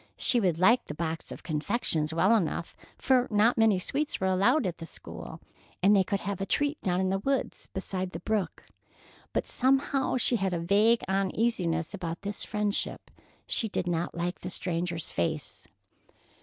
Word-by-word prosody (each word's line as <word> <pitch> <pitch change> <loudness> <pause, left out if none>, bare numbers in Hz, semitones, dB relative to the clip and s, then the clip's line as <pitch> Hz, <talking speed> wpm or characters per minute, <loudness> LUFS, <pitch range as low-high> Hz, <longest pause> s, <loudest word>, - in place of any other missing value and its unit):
She 245 - +3
would 180 -7 +1
like 225 +8 +4
the 150 - -6
box 165 0 -3
of - - -8
confections 155 -1 -1
well 185 +7 +4
enough, 170 -4 -1 0.2
for 255 -1 +3
not 215 +3 +4
many 225 -4 +4
sweets 290 +11 -2
were 190 - -1
allowed 200 +9 +3
at 175 -3 -3
the 165 - -7
school - - -8 0.4
and 205 +2 +6
they 195 - +5
could 195 +2 -2
have 200 -1 -3
a - - 0
treat 290 +1 0
down 180 -1 0
in 190 0 +1
the 195 - 0
woods, 270 +5 -2
beside 190 -1 -4
the 165 - -7
brook. 200 -2 -2 0.7
But - - -1
somehow 270 0 +1
she 240 0 +2
had 190 -2 -1
a 170 - -1
vague 205 +7 +3
uneasiness 190 -4 0
about 170 -4 -5
this 205 0 -4
friendship. 210 -2 -2 0.3
She 220 - +1
did 190 - -2
not 175 -1 -2
like 175 +1 -2
the 180 - -6
stranger's 175 -2 -2
face. 160 -3 -2
190 Hz, 175 wpm, -28 LUFS, 170-225 Hz, 0.7 s, and